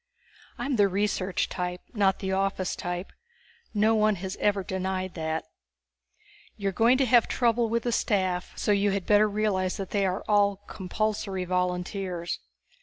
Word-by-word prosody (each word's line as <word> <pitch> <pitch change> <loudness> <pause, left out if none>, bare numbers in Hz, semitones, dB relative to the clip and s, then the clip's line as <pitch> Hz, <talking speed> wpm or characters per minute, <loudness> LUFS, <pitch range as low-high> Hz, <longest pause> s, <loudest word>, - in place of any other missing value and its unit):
I'm 275 -3 -1
the 205 -1 +5
research 195 -1 0
type, 180 0 -3
not 195 -4 +2
the 190 -1 -3
office 195 -1 0
type; 175 +1 -5 0.6
no 215 +1 +3
one 215 -1 +3
has 190 +1 -5
ever 205 -2 +1
denied 185 0 -3
that._ 160 -1 -2 1.2
_You're 200 -1 0
going 235 +6 +4
to 270 - +3
have 240 -1 +5
trouble 235 -1 +2
with 230 +1 0
the 240 - 0
staff, 185 -5 0
so - - +1
you 205 0 +3
had 195 -2 -1
better 210 0 +5
realize 200 -3 0
that 195 -3 -5
they 200 -2 +2
are 185 +2 -2
all 205 -1 +4
compulsory 195 -1 -2
volunteers. 180 0 -2
195 Hz, 155 wpm, -27 LUFS, 185-215 Hz, 1.2 s, the